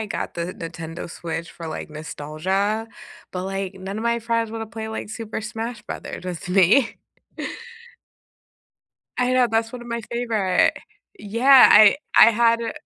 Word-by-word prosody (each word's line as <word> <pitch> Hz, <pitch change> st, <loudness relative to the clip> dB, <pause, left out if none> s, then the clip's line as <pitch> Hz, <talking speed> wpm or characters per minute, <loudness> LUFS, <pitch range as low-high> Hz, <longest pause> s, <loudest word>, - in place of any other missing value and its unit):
I 220 Hz, -, -3 dB
got -, -, -4 dB
the 170 Hz, +2 st, -4 dB
Nintendo 165 Hz, 0 st, -7 dB
Switch 165 Hz, -1 st, -5 dB
for, 165 Hz, -, -9 dB
like, 155 Hz, -, -6 dB
nostalgia, 185 Hz, +8 st, -2 dB, 0.4 s
but, 180 Hz, 0 st, -4 dB
like, 195 Hz, 0 st, -4 dB
none 190 Hz, +2 st, -6 dB
of -, -, -4 dB
my 235 Hz, 0 st, +1 dB
friends 230 Hz, -1 st, -1 dB
wanna 225 Hz, 0 st, -5 dB
play, 220 Hz, 0 st, -7 dB
like, 220 Hz, -, -5 dB
Super 220 Hz, 0 st, -5 dB
Smash 225 Hz, +1 st, -5 dB
Brothers -, -, -7 dB
with 180 Hz, -1 st, -6 dB
me. 195 Hz, +7 st, +4 dB, 2.2 s
I 250 Hz, 0 st, +2 dB
know, 255 Hz, -1 st, +4 dB
that's 225 Hz, 0 st, 0 dB
one 250 Hz, -1 st, -7 dB
of 240 Hz, -, -11 dB
my 235 Hz, 0 st, -3 dB
favorite. 225 Hz, -6 st, +1 dB, 0.4 s
Yeah, 240 Hz, +6 st, +6 dB
I 210 Hz, +3 st, +8 dB, 0.2 s
I 230 Hz, -, +9 dB
had 230 Hz, +1 st, +3 dB
a 230 Hz, -, -3 dB
215 Hz, 160 wpm, -22 LUFS, 185-230 Hz, 2.2 s, I